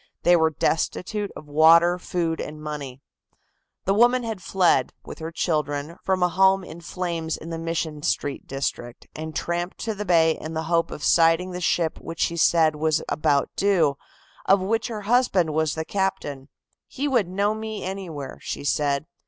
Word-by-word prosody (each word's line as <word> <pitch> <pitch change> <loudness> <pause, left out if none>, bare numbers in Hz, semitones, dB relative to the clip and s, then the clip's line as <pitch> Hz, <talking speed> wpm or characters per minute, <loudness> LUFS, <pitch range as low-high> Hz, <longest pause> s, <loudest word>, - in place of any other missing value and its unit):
They 175 - +6
were 160 -1 +4
destitute 180 +6 -1
of - - -9
water, 165 +4 +5
food 170 -2 -2
and 150 0 -7
money. 145 -3 -7 0.8
The 195 - +2
woman 240 +4 +4
had 220 -4 -4
fled, 180 0 +2
with - - -9
her 160 +1 -5
children, 150 -1 -2
from 190 -1 +1
a - - +5
home 190 +1 +3
in 170 0 -10
flames 170 -2 -3
in 165 - -9
the 165 - -4
Mission 165 -2 -3
Street 145 -1 -2
district, 130 -3 -4
and 155 0 -6
tramped 175 +1 -2
to 220 - -2
the 210 0 -5
bay 165 -4 +4
in 160 +1 -6
the 160 - -1
hope 165 +1 +1
of 150 - -8
sighting 165 +2 +4
the 180 0 -5
ship 165 -1 0
which 165 0 -6
she 170 - +1
said 160 -2 +3
was 155 0 +1
about 145 -1 +1
due, 175 -8 +2 0.5
of 195 +1 +5
which 220 +4 -1
her 220 -3 -5
husband 205 -7 +2
was 155 -1 0
the 160 0 -3
captain. 145 -9 -3 0.4
"He 285 +3 -3
would 240 -9 +2
know 200 +3 0
me 220 -1 -5
anywhere," 180 -8 -6
she - - -5
said. 145 0 0
165 Hz, 175 wpm, -24 LUFS, 155-190 Hz, 0.8 s, They